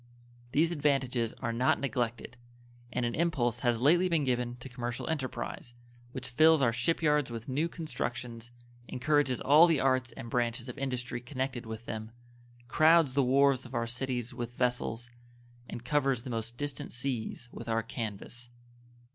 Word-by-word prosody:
These 160 Hz, +5 st, +3 dB
advantages 135 Hz, -7 st, +1 dB
are 115 Hz, -2 st, 0 dB
not 125 Hz, +3 st, +2 dB
neglected, 120 Hz, -4 st, -2 dB, 0.6 s
and 125 Hz, 0 st, -1 dB
an 120 Hz, -, -1 dB
impulse 130 Hz, -8 st, +1 dB
has 120 Hz, -2 st, +1 dB
lately 175 Hz, +6 st, +5 dB
been 165 Hz, -4 st, +2 dB
given 125 Hz, -2 st, 0 dB
to 125 Hz, +2 st, -10 dB
commercial 120 Hz, -2 st, -4 dB
enterprise, 130 Hz, -5 st, -4 dB, 0.4 s
which 130 Hz, 0 st, -6 dB
fills 155 Hz, +5 st, +6 dB
our 120 Hz, -4 st, +3 dB
ship 160 Hz, +8 st, 0 dB
yards 150 Hz, -3 st, +3 dB
with 115 Hz, -1 st, -6 dB
new 145 Hz, +5 st, 0 dB
constructions, 120 Hz, -8 st, -5 dB, 0.4 s
encourages 135 Hz, -1 st, +1 dB
all 155 Hz, +5 st, +7 dB
the 160 Hz, -4 st, +3 dB
arts 130 Hz, -1 st, +2 dB
and -, -, -8 dB
branches 120 Hz, 0 st, -1 dB
of 125 Hz, -, -7 dB
industry 125 Hz, -3 st, -3 dB
connected 130 Hz, -1 st, -4 dB
with 110 Hz, +1 st, -7 dB
them, 110 Hz, -1 st, -5 dB, 0.6 s
crowds 155 Hz, +1 st, +5 dB
the 140 Hz, -, +3 dB
wharves 135 Hz, 0 st, +4 dB
of 125 Hz, +1 st, -9 dB
our 115 Hz, 0 st, +1 dB
cities 125 Hz, 0 st, -3 dB
with 120 Hz, 0 st, -5 dB
vessels, 120 Hz, -1 st, -1 dB, 0.6 s
and 120 Hz, -, -7 dB
covers 135 Hz, -4 st, +1 dB
the 130 Hz, -, -6 dB
most 115 Hz, +1 st, -4 dB
distant 145 Hz, 0 st, -4 dB
seas 120 Hz, -1 st, -3 dB
with 115 Hz, -, -8 dB
our 115 Hz, 0 st, +1 dB
canvas. 115 Hz, +2 st, -5 dB
125 Hz, 160 wpm, -30 LUFS, 120-140 Hz, 0.6 s, all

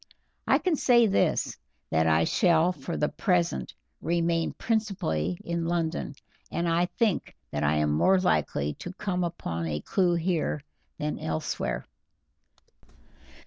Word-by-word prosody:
I -, -, +5 dB
can 360 Hz, -4 st, +1 dB
say 240 Hz, -4 st, +5 dB
this, 200 Hz, -2 st, +1 dB, 0.3 s
that 80 Hz, 0 st, +3 dB
I 80 Hz, 0 st, +4 dB
shall 170 Hz, -, +3 dB
for 140 Hz, -5 st, -5 dB
the 150 Hz, -, +2 dB
present 170 Hz, -, 0 dB, 0.3 s
remain 170 Hz, 0 st, +1 dB
principally 180 Hz, -, -1 dB
in 170 Hz, -1 st, -2 dB
London, 165 Hz, -4 st, -1 dB, 0.4 s
and 170 Hz, -, -1 dB
I 170 Hz, +1 st, +2 dB
think 220 Hz, -1 st, -1 dB, 0.2 s
that 75 Hz, 0 st, -2 dB
I 75 Hz, +1 st, +3 dB
am 75 Hz, -1 st, +2 dB
more 185 Hz, -, +4 dB
likely 75 Hz, -, +1 dB
to 175 Hz, -, -6 dB
come 185 Hz, -2 st, -2 dB
upon 85 Hz, -, -3 dB
a 75 Hz, -1 st, -2 dB
clew 180 Hz, -, +2 dB
here 165 Hz, -4 st, -1 dB, 0.3 s
than 150 Hz, 0 st, -3 dB
elsewhere." 80 Hz, -1 st, -2 dB
170 Hz, 135 wpm, -27 LUFS, -, 0.4 s, I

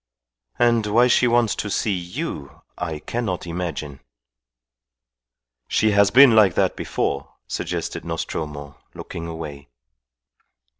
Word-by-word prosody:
"And 115 Hz, -3 st, +3 dB
why 115 Hz, +4 st, +4 dB
she 125 Hz, 0 st, +4 dB
wants 120 Hz, -2 st, +3 dB
to 105 Hz, -, -3 dB
see 100 Hz, +2 st, 0 dB
you 90 Hz, -, -6 dB
I 80 Hz, -1 st, -4 dB
cannot 100 Hz, +2 st, -3 dB
imagine." 85 Hz, -5 st, -5 dB, 1.7 s
"She 110 Hz, -, +2 dB
has 100 Hz, -1 st, +4 dB
been 130 Hz, -1 st, +7 dB
like 100 Hz, -6 st, +5 dB
that -, -, +1 dB
before," 70 Hz, 0 st, -3 dB
suggested -, -, -4 dB
Nostromo, 75 Hz, -3 st, -5 dB, 0.2 s
looking 85 Hz, 0 st, -7 dB
away. 75 Hz, -5 st, -8 dB
90 Hz, 110 wpm, -22 LUFS, 75-115 Hz, 1.7 s, been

